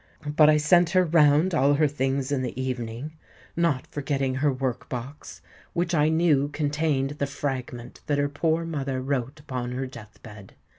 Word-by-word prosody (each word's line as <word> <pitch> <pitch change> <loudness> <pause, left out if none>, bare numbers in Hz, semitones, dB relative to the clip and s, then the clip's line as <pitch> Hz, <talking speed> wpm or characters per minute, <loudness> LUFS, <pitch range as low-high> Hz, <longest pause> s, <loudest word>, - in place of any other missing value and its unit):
But 150 -1 +7
I 155 - +5
sent 170 +3 +4
her 185 0 +3
round 155 +2 +4
all 145 -2 +3
her 150 +1 +3
things 135 -1 -1
in 140 -2 0
the 125 0 -4
evening—not 130 +4 -4
forgetting 135 -2 -1
her 140 +2 +1
work 130 -2 -3
box, 130 +4 -7 0.3
which 175 0 -1
I 150 -1 +3
knew 160 -4 +3
contained 145 -1 -1
the 140 - 0
fragment 130 -4 -5
that 145 - +1
her 145 0 +1
poor 160 +3 0
mother 140 -5 -3
wrote 135 +1 -3
upon 125 -4 -5
her 130 +1 -3
death 115 -5 -12
bed. 105 -3 -12
140 Hz, 165 wpm, -25 LUFS, 130-155 Hz, 0.3 s, But